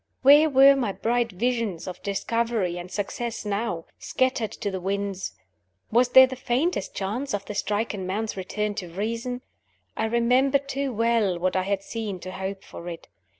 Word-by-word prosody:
Where 295 +3 +8
were 275 0 +7
my 240 -7 -1
bright 235 +1 0
visions 225 -3 -1
of 180 -1 -7
discovery 205 -2 -1
and 175 +1 -8
success 215 +4 -4
now? 200 -5 -2
Scattered 255 -4 0
to 205 - -3
the 190 - -3
winds! 195 0 -2 0.6
Was 240 +2 +4
there 260 +1 +9
the 260 0 -6
faintest 255 - -1
chance 210 +6 -2
of 200 -1 -5
the - - -5
stricken 205 -1 -2
man's 215 +3 -2
return 210 +2 -2
to 180 - -9
reason? 230 +7 -3 0.5
I 220 - 0
remembered 255 +5 +2
too 275 0 -2
well 230 -5 +2
what 185 +2 0
I 185 - +3
had 195 +1 -1
seen 210 -4 -4
to 185 - -6
hope 190 +1 -5
for 175 - -8
it. 165 -1 -9
215 Hz, 170 wpm, -25 LUFS, 195-245 Hz, 0.6 s, there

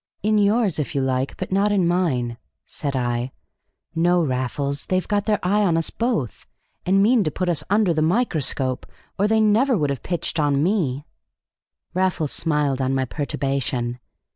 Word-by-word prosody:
"In 215 0 +3
yours, 205 -4 +2
if 150 0 -3
you 140 - +1
like, 130 0 -1
but 185 - -5
not 200 +2 +2
in 190 -4 +2
mine," 130 -10 0 0.3
said 140 -2 -4
I. 120 0 -1 0.6
"No, 175 +1 +3
Raffles, 140 +1 -2
they've 185 -1 0
got 205 -1 0
their 210 -1 +3
eye 200 +4 +2
on 170 -5 +2
us 165 - -1
both, 225 - -2 0.4
and 195 +2 +4
mean 230 0 +4
to 155 - 0
put 185 +4 -3
us 175 -3 0
under 205 -3 +3
the 155 - 0
microscope, 155 - 0 0.3
or 205 - +3
they 220 +1 +3
never 220 +4 +3
would 145 -4 0
have 135 -4 -4
pitched 170 -2 -2
on 145 -1 +2
me." 155 -8 0 0.9
Raffles 180 -5 0
smiled 150 -4 0
on 130 +1 0
my 130 0 +1
perturbation. 135 -3 -2
165 Hz, 170 wpm, -22 LUFS, 135-200 Hz, 0.9 s, and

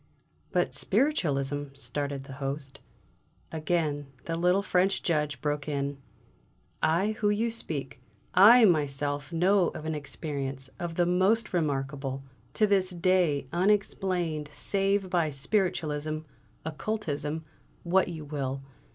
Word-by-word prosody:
"But - - +1
Spiritualism 145 - +1
" - - -22
started 140 0 -4
the 135 0 -10
Host. 135 0 -4 0.7
Again 155 -3 -1 0.2
the 165 - -2
little 180 +4 +3
French 190 0 +2
Judge 150 -5 0
broke 145 -1 -1
in: 140 -1 -2 0.8
"I 175 +7 +2
who 210 - +3
you 220 +3 +1
speak, 140 - -5 0.3
I 225 +6 +9
myself 145 -4 +1
know 180 +2 +3
of 155 - -6
an 160 - -1
experience, 140 -2 -4
of 170 -1 -4
the 175 - +3
most 190 +6 +2
remarkable, 135 -4 -1 0.3
to 215 - +5
this 195 -3 +2
day 175 -5 +2
unexplained 180 -5 +1
save 195 +3 +1
by 175 -4 +1
Spiritualism, 155 -1 -1 0.4
Occultism, 160 -3 -3 0.4
what 185 +2 +3
you 160 -3 -6
will! 135 -2 -3
155 Hz, 120 wpm, -28 LUFS, 145-185 Hz, 0.8 s, I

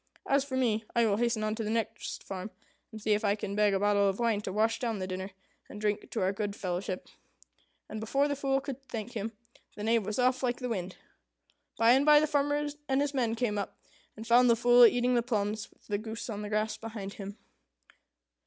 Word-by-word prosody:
As 275 0 +2
for 265 -2 -4
me, 225 -4 +1
I 235 -1 +4
will 205 -2 +2
hasten 235 -1 0
on 215 0 0
to 225 0 -3
the 210 - -3
next 225 -1 -3
farm, 190 +1 -6 0.4
and 220 - -8
see 215 0 -1
if 210 +2 0
I 200 -1 +2
can 205 -1 -5
beg 210 -1 +3
a - - +1
bottle 205 0 +3
of 195 - -2
wine 230 -3 +1
to 195 - -4
wash 220 +3 +1
down 230 -3 -1
the 185 - -3
dinner, 185 +1 -4 0.4
and 210 - -8
drink 210 0 -1
to - - -3
our 190 +1 +1
good 205 0 -3
fellowship." 185 0 -4 0.8
And 215 - -6
before 275 +6 +1
the 285 - -1
Fool 270 -1 0
could 275 -1 -6
thank 225 +1 -5
him, 220 -1 -4 0.4
the 210 - -6
Knave 225 0 +2
was 210 +2 -3
off 255 0 +2
like 245 -2 0
the 250 -1 -4
wind. 185 -5 -3 0.8
By 230 +1 +5
and 265 +3 +5
by 300 0 +7
the 305 - +2
farmer 290 0 +1 0.2
and 265 0 +2
his 290 0 0
men 235 -4 0
came 225 -3 -1
up, 200 - -5 0.4
and 220 - -7
found 240 +2 +5
the 235 - +6
Fool 240 +1 +7
eating 245 +2 +1
the 240 - +3
plums, 215 -3 -2
with - - -28
the 205 -1 -2
goose 225 +2 -6
on 210 -1 -4
the 210 - -5
grass 215 +1 0
beside 215 -3 -7
him. 200 +1 -8
220 Hz, 230 wpm, -30 LUFS, 205-245 Hz, 0.8 s, by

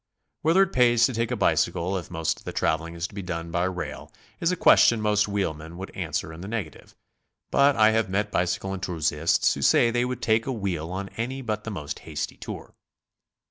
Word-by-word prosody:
Whether 165 +5 +5
it 195 - -4
pays 120 -2 +5
to 130 - -1
take 115 0 -1
a - - -1
bicycle 90 +3 +1
if 90 -3 -5
most 80 -2 -2
of - - -18
the - - -4
traveling 85 +2 -1
is 85 +1 -3
to - - -19
be 100 - -5
done 85 -2 -5
by 85 +1 +1
rail, 90 -5 -5 0.3
is 170 - +1
a - - 0
question 120 -8 +5
most 105 -1 +2
wheelmen 85 -5 -3
would 95 +1 -7
answer 80 - -3
in 80 - -10
the 95 - -7
negative, 105 -8 -6 0.6
but 140 0 +4
I 110 0 +5
have 110 -3 +1
met 105 +2 -1
bicycle 90 +2 -1
enthusiasts 80 -4 +1
who - - -6
say 120 - +4
they 120 +1 +1
would 125 -1 -4
take 110 +2 +2
a - - 0
wheel 95 -9 -3
on 95 +1 -4
any 130 +4 -3
but 110 -2 -3
the - - -3
most 80 -9 -5
hasty 75 -1 -5
tour. - - -8
100 Hz, 215 wpm, -25 LUFS, 85-115 Hz, 0.6 s, Whether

